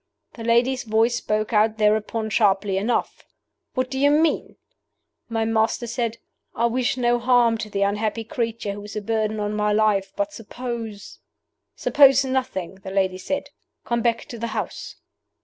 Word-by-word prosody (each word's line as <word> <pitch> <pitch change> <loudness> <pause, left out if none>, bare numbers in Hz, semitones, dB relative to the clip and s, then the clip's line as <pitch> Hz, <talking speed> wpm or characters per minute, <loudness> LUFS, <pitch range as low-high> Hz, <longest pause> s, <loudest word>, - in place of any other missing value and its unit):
The 230 - -9
lady's 240 +3 +2
voice 225 +2 +2
spoke 215 +1 -1
out 215 +1 +3
thereupon 215 +1 +1
sharply 200 -2 +2
enough, 225 +5 -1 0.5
'What 255 0 -1
do 265 - -2
you 285 +1 +5
mean?' 310 +2 +1 0.7
My 225 -1 0
master 225 +1 +1
said, 235 -1 -2 0.4
'I 235 - +1
wish 255 0 0
no 240 -1 +2
harm 240 -1 +4
to 215 - -5
the 200 -1 0
unhappy 210 +3 -1
creature 230 -2 -3
who 205 +1 -7
is 210 +1 -9
a 215 - -2
burden 215 0 -1
on 210 0 -2
my 210 0 +1
life; 210 -2 +2
but 305 0 -2
suppose 230 -3 -7 0.3
' - - -56
'Suppose 275 -1 +5
nothing,' 250 -9 -2
the 190 - -7
lady 190 -1 0
said; 280 +9 -3 0.3
'come 235 0 0
back 230 0 0
to 235 - -7
the 235 - -2
house. - - -5
225 Hz, 165 wpm, -23 LUFS, 210-240 Hz, 0.7 s, you